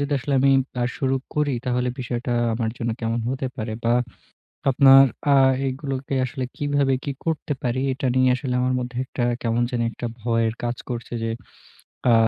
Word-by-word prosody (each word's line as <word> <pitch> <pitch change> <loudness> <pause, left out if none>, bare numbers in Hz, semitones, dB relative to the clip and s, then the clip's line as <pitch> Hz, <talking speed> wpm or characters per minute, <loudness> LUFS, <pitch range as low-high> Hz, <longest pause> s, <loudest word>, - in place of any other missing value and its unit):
যদি 145 +1 -1
আসলে 140 +2 -2
আমি 140 - +5 0.3
আ - - +2
শুরু 135 -2 +1 0.2
করি 150 -3 +1
তাহলে 125 0 +1
বিষয়টা 120 0 -3 0.2
আমার 110 -1 -1
জন্য 115 -1 -1
কেমন 115 0 -1
হতে 130 +1 -2
পারে? 110 0 -4
বা 115 - +3 0.8
আপনার 135 0 +8 0.3
আ - - +6 0.3
এগুলোকে 135 0 -3
আসলে 130 +1 -4
কীভাবে 145 -2 +1
কি 140 - -2
করতে 155 -2 -1
পারি? 125 +1 0
এটা 135 0 -2
নিয়ে 130 0 +4
আসলে 130 -1 -3
আমার 130 0 +1
মধ্যে 125 0 -5
একটা 125 -1 -3 0.2
কেমন 115 0 +1
জানি 120 -1 0
একটা 120 - -5
ভয়ের 115 -1 +1
কাজ 120 0 -1
করছে, 120 0 -5
যে 115 - -1 0.8
আ - - +6
130 Hz, 175 wpm, -23 LUFS, 120-135 Hz, 0.8 s, আপনার